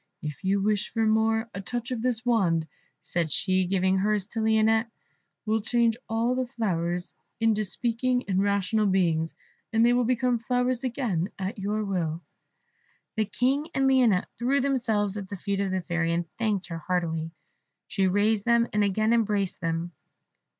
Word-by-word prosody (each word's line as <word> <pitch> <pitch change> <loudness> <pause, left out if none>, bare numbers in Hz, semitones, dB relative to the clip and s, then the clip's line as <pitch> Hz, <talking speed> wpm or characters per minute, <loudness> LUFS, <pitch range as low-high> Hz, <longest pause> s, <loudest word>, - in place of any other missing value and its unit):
If 150 +4 -6
you 195 +1 +2
wish 210 -1 0
for 225 0 +1
more, 220 +1 +2
a 200 - -5
touch 240 +6 -4
of 240 -3 -2
this 245 -1 0
wand," 175 -9 +2 0.4
said 170 -3 -2
she, 185 +2 +2
giving 190 +1 +1
hers 205 -1 +1
to 230 - -4
Lionette, 220 +1 +3 0.6
"will 220 0 +1
change 235 +1 +2
all 230 +2 +1
the 255 0 -1
flowers 175 -7 -2 0.3
into 220 -1 +2
speaking 245 +5 -1
and 190 -1 +1
rational 200 +1 +1
beings, 165 -4 +1 0.4
and 225 +1 +4
they 240 - +5
will 245 0 +3
become 245 0 +1
flowers 250 +1 0
again 230 - -1
at 195 +3 -4
your 210 +2 -1
will." 170 -4 -2 0.9
The 215 -1 +1
King 270 +8 0
and 270 0 +3
Lionette 245 -8 +4
threw 260 +4 +2
themselves 225 -7 0
at 195 -2 -6
the 200 - -5
feet 200 +1 -2
of 200 -1 0
the 185 0 -1
Fairy, 170 -1 -1
and 170 0 -1
thanked 210 -5 -1
her 165 -1 -4
heartily. 165 -1 -1 0.6
She 195 -3 0
raised 205 +2 +2
them, 235 0 +3
and 210 0 +3
again 215 +3 +2
embraced 210 -4 0
them. 165 +1 -2
210 Hz, 170 wpm, -27 LUFS, 185-235 Hz, 0.9 s, they